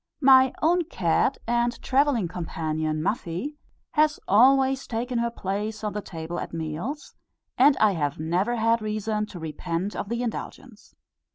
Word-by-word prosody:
My 260 -1 +7
own 345 +2 +3
cat 185 - +1
and 240 +1 0
travelling 270 -7 +2
companion 155 -3 -3
Muffie, 240 - -3 0.3
has 305 -1 +2
always 265 +5 +4
taken 240 +1 -2
her 235 0 0
place 210 0 -4
on 210 - -2
the 210 - -3
table 170 -2 -6
at - - -6
meals, 165 - -5 0.4
and 275 +2 +5
I 215 -1 +4
have 145 -6 -2
never 180 +9 0
had 230 0 +2
reason 215 0 -2
to 190 - -10
repent 170 +4 -4
of 200 - -4
the 235 +1 -2
indulgence. 235 0 -7
215 Hz, 150 wpm, -25 LUFS, 175-260 Hz, 0.4 s, My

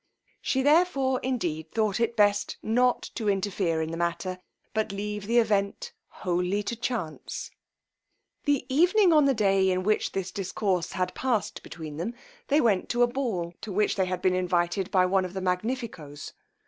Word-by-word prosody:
She 265 0 0
therefore 285 -4 +3
indeed 170 -12 -2
thought 215 -3 0
it 235 0 0
best 205 -1 +2
not 245 +3 +2
to 215 -2 -1
interfere 190 -4 0
in 160 - -4
the 165 - -4
matter, 170 +2 -2 0.3
but 220 -1 0
leave 205 0 -4
the 235 +2 +2
event 220 - +1
wholly 180 +2 -1
to 235 - -3
chance. 225 -9 -4 0.9
The 285 -3 +1
evening 350 +7 +4
on 300 -2 +6
the 275 -1 +3
day 195 -3 +3
in 185 0 0
which 215 +2 +1
this 190 -1 -3
discourse 190 -2 -1
had 185 -1 -1
past 240 -7 -1
between 155 -3 -8
them, 210 +9 -3 0.3
they 290 +2 +4
went 210 -9 +2
to 240 0 +3
a - - +5
ball, 225 -10 -2
to 220 - -6
which 210 +2 +1
they 190 - +1
had 185 0 -3
been 185 - +3
invited 180 0 0
by 185 -1 +4
one 190 +1 +2
of 180 0 -5
the 190 - -2
Magnifico's. 180 - -3
200 Hz, 175 wpm, -27 LUFS, 180-240 Hz, 0.9 s, on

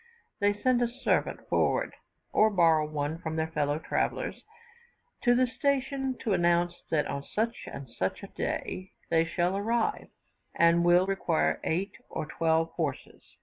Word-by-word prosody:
They 205 0 +2
send 250 +2 +2
a 240 - +3
servant 250 +3 -1
forward - - +1 0.4
or 215 - +5
borrow 165 -6 +4
one 150 +1 -2
from 160 -2 -4
their 160 0 -1
fellow 145 -1 0
travellers, 160 - -2 0.8
to 245 -1 +4
the 255 +1 +4
station 270 0 -1
to 215 - 0
announce 175 0 +2
that 150 -2 +1
on 140 - -4
such 225 +9 -3 0.6
a - - -6
day 185 0 -3 0.2
they 165 0 +4
shall 175 +3 0
arrive, 225 +3 0 0.5
and 170 0 +4
will 175 +1 +5
require 190 -4 +1
eight 185 +5 -1
or - - -3
twelve 160 +1 +1
horses. 150 -6 -5
175 Hz, 145 wpm, -29 LUFS, 160-225 Hz, 0.8 s, or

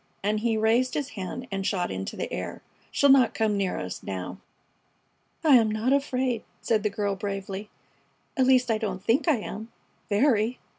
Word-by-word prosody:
and 210 +1 +1
he 225 0 +1
raised 230 +4 +2
his 285 -2 -2
hand 220 +4 -6
and 195 0 -2
shot 180 -2 -1
into 95 0 -4
the - - -4
air. - - -5 0.3
"She'll 280 -1 +4
not 260 -4 +5
come 220 -2 +1
near 195 -2 -1
us 90 0 -5
now." 90 -1 -5 1.0
"I 295 -5 +7
am 225 -2 +3
not 220 +5 +1
afraid!" 260 -4 0 0.2
said 220 -2 +1
the 210 - +1
girl, 200 0 -1
bravely. 195 +1 -5 0.7
"At 260 -2 +3
least, 255 -2 +4
I 220 - +1
don't 195 -4 -3
think 250 - +2
I 315 - +5
am 220 +1 -7 0.4
very! 225 +1 +2
220 Hz, 180 wpm, -26 LUFS, 195-255 Hz, 1.0 s, I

